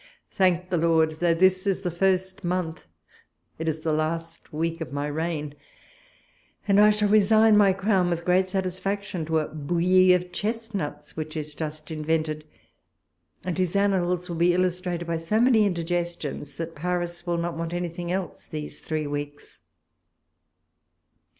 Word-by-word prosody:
Thank 185 -1 +1
the 175 - +2
lord! 160 -1 +2
though 170 -1 +3
this 185 +2 +3
is 195 -1 +1
the 180 -2 -2
first 190 +2 0
month, 175 -2 -2 0.7
it 160 - -3
is 160 0 -1
the 160 -1 0
last 165 +1 -3
week 165 +2 -2
of 155 - -5
my 145 +1 -2
reign; 150 -1 -3 1.1
and 200 0 +5
I 210 0 +8
shall 210 0 +2
resign 215 +1 +5
my 205 -2 +6
crown 190 -1 +1
with 170 -1 -2
great 185 +1 +3
satisfaction 190 -1 -2
to 160 0 +1
a 155 - 0
bouillie 175 +4 +3
of 180 0 -3
chestnuts, 215 -6 -4
which 155 0 -5
is 150 -1 -4
just 155 0 -6
invented, 155 0 -1 1.0
and 180 -1 -2
whose 185 0 -1
annals 180 -3 +1
will 170 - -4
be 175 +1 +3
illustrated 180 -1 -1
by 170 -1 -1
so 165 +7 0
many 230 -4 +5
indigestions, 170 -5 -3
that 165 +2 -5
Paris 175 +1 -3
will 170 0 0
not 170 0 -2
want 165 0 -4
anything 175 0 -3
else 185 0 -4
these 150 -2 -7
three 155 -1 -3
weeks. 145 0 -6
175 Hz, 155 wpm, -25 LUFS, 160-185 Hz, 1.1 s, I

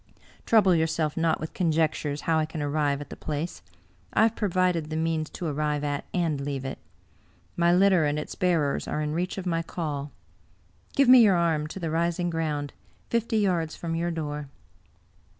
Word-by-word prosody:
Trouble 205 -5 +5
yourself 160 -2 0
not 165 -1 +1
with 155 - -6
conjectures 155 -4 0
how 160 0 +1
I 155 - +1
can 160 0 -6
arrive 145 -1 0
at 145 - -10
the - - -6
place. 155 +3 -4 0.5
I - - +4
have 225 0 +2
provided 180 -5 0
the 155 - -3
means 160 -1 -1
to 175 - -6
arrive 150 -1 -1
at 145 -1 -2
and 165 -5 0
leave 140 -1 -4
it. 135 - -5 0.8
My 170 0 +3
litter 185 -2 +4
and 145 0 0
its 150 - -5
bearers 165 -6 0
are 155 - -2
in 150 0 -2
reach 180 +4 -2
of 190 - -5
my 165 -2 0
call. 150 -4 -4 0.8
Give 275 -2 +4
me 255 0 +9
your 205 -5 +5
arm 165 -3 +1
to 180 - -7
the 165 -3 -3
rising 170 +1 0
g^oimd, 150 -3 -2 0.4
fifty 230 -1 +1
yards 175 -6 +1
from 165 -1 -4
your 170 +1 -1
door." 150 -3 -4
160 Hz, 185 wpm, -26 LUFS, 150-175 Hz, 0.8 s, me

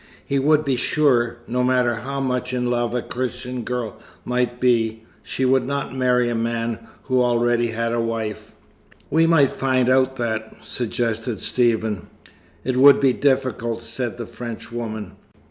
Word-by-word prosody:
He 140 - 0
would 155 +2 +3
be 135 -2 +1
sure, 120 -4 +2
no 125 +1 -1
matter 125 -2 +2
how 135 +4 -4
much 125 -1 -1
in 125 -1 0
love 120 0 0
a 125 - -1
Christian 125 0 -4
girl 120 -3 -4 0.3
might 125 0 -1
be, 115 -3 +1 0.2
she 130 - -2
would 130 +1 +3
not 140 0 -3
marry 125 -1 +2
a 120 - 0
man 115 0 -1 0.2
who 130 -2 +1
already 120 -1 +2
had 115 0 -2
a 120 - +1
wife." 115 -2 -4 0.6
"We 165 +1 +4
might 150 -5 +4
find 130 -2 +1
out 130 0 +3
that," 110 -3 -3
suggested 115 -1 -2
Stephen. 110 -5 0 0.6
"It 130 -1 -1
would 140 +2 +8
be 135 -2 +4
difficult," 125 -5 0
said 120 0 -4
the 120 - -5
Frenchwoman. 115 -2 -6
125 Hz, 155 wpm, -22 LUFS, 115-130 Hz, 0.6 s, would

